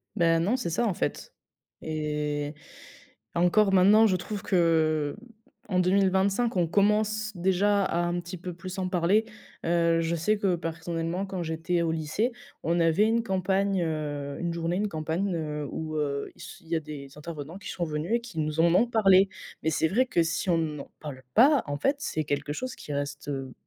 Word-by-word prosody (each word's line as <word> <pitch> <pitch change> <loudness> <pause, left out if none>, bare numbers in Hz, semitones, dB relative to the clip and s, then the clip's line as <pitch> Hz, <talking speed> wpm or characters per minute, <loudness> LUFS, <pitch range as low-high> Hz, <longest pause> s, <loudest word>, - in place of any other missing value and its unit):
Bah, 165 -1 +3
non, 210 +10 +1
c'est 210 - -3
ça, 205 +9 0
en 205 - +1
fait - - -3 0.5
et 150 -1 -2 0.8
encore 185 +4 +4
maintenant, 205 +4 +6
je 185 - +2
trouve 205 +3 -5
que, 160 -5 +2 0.5
en 185 -2 +2
2025, 195 +4 +2
on 170 -2 +2
commence 215 +3 +2
déjà 190 +3 +2
à 170 - -1
un 175 0 0
petit 175 +1 -7
peu 180 +1 -6
plus 185 +2 -7
en 185 -1 -1
parler. 185 +5 +2 0.4
Heu, 170 -1 +3
je 165 +1 0
sais 210 +6 +1
que 190 -4 +2
personnellement, 165 +2 -3
quand 185 -2 -4
j'étais 165 +2 -1
au 165 - 0
lycée, 160 +10 -1 0.3
on 170 +1 +1
avait 165 +5 +4
une 230 +1 +2
campagne, 190 -1 +1
heu, 145 -3 -3
une 170 -1 -2
journée, 170 +2 -1
une 210 +1 0
campagne, 165 +4 -2
heu, 150 -3 -3
où, 155 -1 -4
heu, 140 -2 -2
il - - -15
se 190 - -11
il 165 - -18
y 170 - +1
a 160 - +2
des 145 -3 -8
intervenants 155 +2 -7
qui - - -8
sont 175 - -2
venus 155 +6 -3
et 235 - 0
qui 210 -9 -7
nous 155 +1 -1
en 170 +1 +5
ont 235 +6 +4
parlé. 195 -4 +5 0.3
Mais 160 - +2
c'est 160 - +2
vrai 240 +9 +2
que 170 - +2
si 165 +3 -2
on 170 - +4
n'en 150 -3 -3
parle 140 -4 -7
pas, 275 +4 +6
en 145 0 -2
fait, 275 - +1
c'est 155 - -2
quelque 145 0 -2
chose 255 +9 -4
qui - - -9
reste, 145 +1 -4
heu, 135 -2 -4
170 Hz, 200 wpm, -27 LUFS, 155-195 Hz, 0.8 s, maintenant